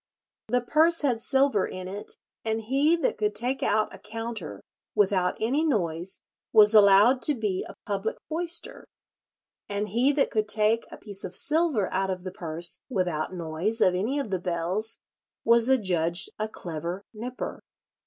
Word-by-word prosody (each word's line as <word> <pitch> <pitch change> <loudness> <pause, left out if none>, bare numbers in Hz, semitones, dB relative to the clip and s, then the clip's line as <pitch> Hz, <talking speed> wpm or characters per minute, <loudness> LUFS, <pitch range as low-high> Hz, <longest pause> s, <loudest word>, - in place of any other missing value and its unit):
The 245 +2 +1
purse 315 +6 +3
had 245 -5 +1
silver 265 -6 +3
in 185 0 -7
it, 200 +2 -6 0.3
and 220 0 -1
he 275 +8 +2
that 335 - -1
could 210 -1 0
take 250 +5 +1
out 215 0 +1
a - - -11
counter 220 - -6 0.4
without 190 -3 +2
any 265 +8 +1
noise 180 - -1 0.3
was 210 -1 +7
allowed 210 +5 +6
to 295 - +1
be 210 -5 -2
a - - -10
public 205 +1 -2
foyster; 345 +9 -4 0.8
and 205 +1 -2
he 240 +7 +2
that 280 -1 +1
could 215 -1 0
take 215 +2 +2
a - - -10
piece 200 -2 -6
of 185 0 -6
silver 300 - +2
out 190 +1 0
of 185 -1 -4
the 185 - -5
purse 170 -1 -1
without 180 - -2
noise 170 +6 -2
of 185 - +4
any 215 +10 -1
of 275 -8 -3
the 185 - 0
bells 180 +5 -2 0.5
was 235 +1 +5
adjudged 180 -7 +2
a 215 0 -2
clever 170 0 -6
nypper. 245 +4 -6
210 Hz, 165 wpm, -26 LUFS, 185-250 Hz, 0.8 s, was